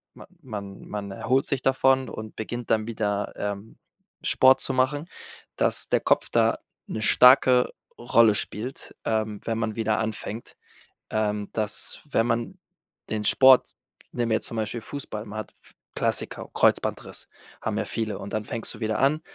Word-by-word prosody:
man - - -13 0.2
man 100 -5 -8
man 100 -1 -5
erholt 130 +7 +1
sich 135 - -1
davon 135 -1 +3
und 110 0 -8
beginnt 120 +2 -5
dann 110 -1 +2
wieder, 105 -3 -2
ähm, 100 +1 -5 0.5
Sport 130 0 +5
zu - - 0
machen, 140 +5 +1 0.5
dass - - +1
der - - +3
Kopf - - +2
da - - +3 0.3
'ne 110 - -4
starke 125 +2 +6 0.3
Rolle 115 -2 +4
spielt, 115 +5 -5
ähm, 110 -2 -1
wenn 115 -1 -1
man 110 -1 -2
wieder 110 -1 0
anfängt. 110 0 -5 0.6
Ähm, 105 -1 -1
dass, 110 -1 -3
wenn 115 -5 +2
man 120 +11 -2 0.5
den 110 -1 -1
Sport 130 +2 +6 0.4
nehmen 120 -2 -1
wir 110 - +4
jetzt - - -6
zum 115 - -6
Beispiel 110 +1 -3
Fußball, 120 -7 -6
man 105 0 -8
hat 110 - -7
f - - -19 0.2
Klassiker, - - -1
Kreuzbandriss - - +1 0.3
haben - - -2
ja - - -1
viele. 110 -3 -3
Und 100 0 -7
dann 110 -1 -2
fängst 115 +1 -4
du - - -11
wieder 110 0 -1
an 145 +4 +2
110 Hz, 165 wpm, -25 LUFS, 105-125 Hz, 0.6 s, starke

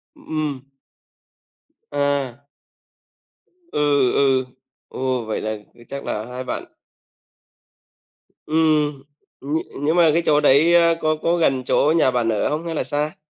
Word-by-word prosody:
Ừm. 155 - -4 1.3
À. 140 -2 -1 1.3
Ừ, 145 -3 +2
ừ. 135 -2 +2 0.4
Ồ! 130 -2 -2
Vậy 110 - -3
là 110 0 -3 0.3
chắc 140 0 -6
là 105 - -3
hai 125 +1 -6
bạn - - -4 1.8
Ừm, 150 -3 +1 0.4
nh 145 +4 -2 0.2
nhưng 155 +3 +1
mà 170 -2 +5
cái 170 - +2
chỗ 150 -1 +4
đấy, 150 +4 +5
a, 170 -1 +5
có 155 0 +1
có 165 +2 0
gần 135 -6 +1
chỗ 150 +4 +2
nhà 130 -5 +3
bạn 120 -2 0
ở 110 -2 0
hông 155 +3 -3
hay 165 - -4
là - - -1
xa? 150 +1 -1
145 Hz, 135 wpm, -21 LUFS, 130-155 Hz, 1.8 s, mà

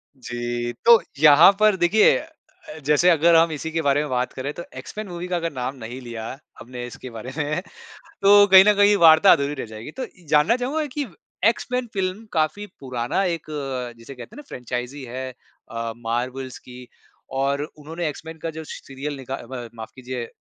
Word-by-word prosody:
जी 120 -1 -4
तो 235 -1 +8 0.2
यहाँ 150 +4 +8
पर 215 -1 +5
देखिए 185 +5 +4
अ, 315 - -13
जैसे 150 +5 +4
अगर 170 0 +5
हम 165 0 +5
इसी 155 +1 -5
के 165 0 -1
बारे 145 -1 +2
में 150 - -4
बात 125 -1 -1
करें 140 +3 -4
तो 170 - -7
एक्स-मेन 215 0 -7
मूवी 175 0 -6
का 180 - -2
अगर 165 -1 -2
नाम 130 +1 -4
नहीं 125 0 -8
लिया 115 -2 -7 0.3
हमने 125 0 -7
इसके 125 +1 -10
बारे 115 +2 -8
में 155 +3 -1 0.6
तो 205 +1 +7
कहीं 190 -1 +9
न 210 - +7
कहीं 205 +1 +5
वार्ता 160 +4 +8
अधूरी 140 +1 +2
रह 135 - -5
जाएगी। 110 +5 -9
तो 260 - -2 0.2
जानना 150 +10 +4
चाहूँगा 280 +5 -2
कि 295 -1 -1 0.4
एक्स-मेन 250 +1 -3
फ़िल्म 190 +2 -3
काफ़ी 160 +6 0
पुराना 125 +6 -2
एक 170 -3 -2 0.5
जिसे 115 +4 -11
कहते 120 -2 -11
हैं - - -13
ना - - -18
फ्रैंचाइज़ी 125 +3 -5
है 130 +1 -6 0.4
अ, 115 0 -3
मार्वल्स 125 +3 -4
की। 125 0 -12 0.5
और 140 +1 0 0.2
उन्होंने 160 +3 -5
एक्स-मेन 160 +2 -9
का 165 - -2
जो 160 0 -7
स - - -8
सीरियल 140 +2 -5
निका 135 0 -5 0.2
म 120 -2 -6
माफ़ 110 -1 -8
कीजिए 125 -2 -6
145 Hz, 190 wpm, -23 LUFS, 125-175 Hz, 0.6 s, कहीं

